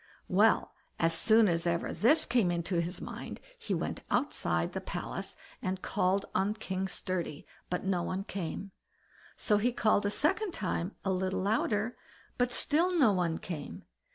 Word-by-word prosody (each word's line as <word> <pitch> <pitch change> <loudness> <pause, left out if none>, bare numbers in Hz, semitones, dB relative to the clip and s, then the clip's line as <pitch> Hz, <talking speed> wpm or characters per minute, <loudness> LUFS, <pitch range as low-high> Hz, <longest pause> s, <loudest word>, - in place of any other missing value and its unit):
Well, - - +3 0.2
as 165 0 +2
soon 220 +6 +5
as 170 -1 +1
ever 170 0 0
this 275 +9 +4
came 240 -7 +2
into 170 0 0
his 175 +2 -4
mind, - - -7 0.2
he 460 - -2
went - - -3
outside - - 0
the - - -4
palace - - -5 0.3
and 185 0 -2
called 190 +2 +1
on 200 +3 +1
King 190 -3 -3
Sturdy, 180 -5 -3 0.2
but 180 - -2
no 190 -2 +1
one 185 +2 -2
came. 195 0 -5 0.7
So 210 - +2
he 240 +4 +2
called 215 -3 +2
a - - +1
second 345 - +1
time 185 -1 -2
a 190 - +2
little 185 0 0
louder, 215 +2 0 0.4
but 245 0 +2
still 345 +8 +2
no 260 -9 +6
one 175 -4 0
came. 165 -5 -6
195 Hz, 160 wpm, -31 LUFS, 180-225 Hz, 0.7 s, no